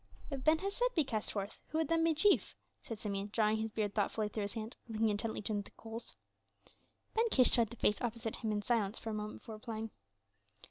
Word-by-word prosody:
"If 270 -2 -3
Ben 310 +1 +6
Hesed 410 +7 0
be 320 - +5
cast 220 -6 -1
forth, 200 -1 -3
who 315 - -2
would 320 -2 +2
then 330 +1 +3
be 330 -1 +3
chief?" 405 +6 +4 0.3
said 225 -4 -6
Simeon, 200 -1 -3
drawing 215 0 +3
his 220 0 -1
beard 210 -2 -1
thoughtfully 210 0 +1
through 215 - -3
his 200 0 -2
hand 220 +2 -4
and 225 - -6
looking 220 0 +3
intently 215 +2 -1
into 210 -2 0
the - - -12
coals. 225 +1 -7 1.0
Ben 455 +1 +3
Kish 255 - +5
studied 230 -3 +4
the 235 - -8
face 210 -3 +3
opposite 230 -2 -2
him 220 - -1
in 205 -1 0
silence 225 -3 +1
for 225 - -4
a - - -3
moment 210 0 -4
before 220 -1 -8
replying. 220 0 -5
225 Hz, 225 wpm, -35 LUFS, 210-255 Hz, 1.0 s, Ben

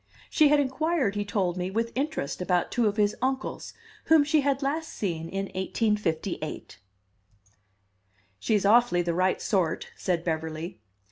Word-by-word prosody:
She 310 - +5
had 295 0 +5
inquired, 285 -3 0
he 205 0 -1
told 190 -3 -1
me, 180 0 -2
with 230 +4 -1
interest 275 - -2
about 180 -1 +1
two 235 -2 +2
of 205 +1 -1
his 205 -1 +2
uncles, 265 +1 -3 0.3
whom 320 -2 +6
she 295 +1 +2
had 275 0 0
last 315 +4 -1
seen 165 -5 -3
in 195 0 -2
1858. 190 - -2 1.6
"She's 210 - +1
awfully 215 -4 +4
the 170 0 -1
right 185 +2 +1
sort," 180 -6 0
said 175 -3 -1
Beverly. 160 -3 -4
205 Hz, 145 wpm, -27 LUFS, 175-265 Hz, 1.6 s, whom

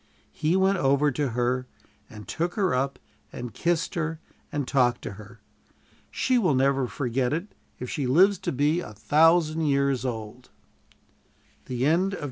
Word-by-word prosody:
He 155 +4 0
went 190 0 +2
over 140 +1 +3
to 140 +2 -1
her, 125 +2 -1 0.4
and 105 -1 -11
took 170 +2 -2
her 195 -4 +1
up 135 +1 -1 0.3
and 120 -2 -7
kissed 170 0 -1
her 165 -1 -2 0.3
and 145 -3 -2
talked 125 -3 +2
to - - -5
her. 105 +2 -13 0.7
She 255 -2 +1
will 180 - +2
never 135 0 +2
forget 125 -1 -1
it 170 +7 -4 0.2
if 125 - -6
she 135 +1 -2
lives 185 +8 +4
to - - -3
be 145 +5 +1
a 110 - -7
thousand 160 +7 +3
years 140 -2 +1
old. 120 0 -6 1.2
CHAPTER 125 0 -1 0.2
XIII. 195 - -5
140 Hz, 155 wpm, -26 LUFS, 125-165 Hz, 1.2 s, lives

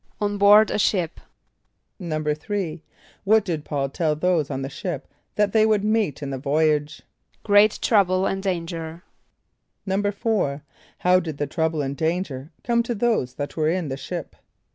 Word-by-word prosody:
=On 205 -1 -1
board 205 +2 +7
a - - 0
ship.= 180 -5 0 0.8
=3.= 155 +2 -3 0.4
What 215 +1 +4
did 160 -5 -3
P[a:]ul 140 -2 -2
tell 155 +2 0
those 165 -2 +1
on 135 -1 -3
the - - -3
ship 145 -1 -5 0.3
that 210 -1 +1
they 220 -1 +5
would 215 -2 +2
meet 210 -9 0
in 140 - -4
the 135 - -4
voyage? 150 +1 0 0.4
=Great 205 +1 +5
trouble 190 -4 +3
and 195 0 -1
danger.= 170 -3 -4 0.8
=4.= 200 -6 0 0.4
How 180 +1 +4
did 160 -5 -5
the 145 - -1
trouble 160 0 -1
and 135 +1 -3
danger 160 -4 -2
come 235 -1 +2
to 235 0 -3
those 205 - 0
that 145 0 -5
were 155 -1 +1
in 170 -3 -1
the 135 - -2
ship? 165 +4 -6
170 Hz, 160 wpm, -23 LUFS, 150-205 Hz, 0.8 s, board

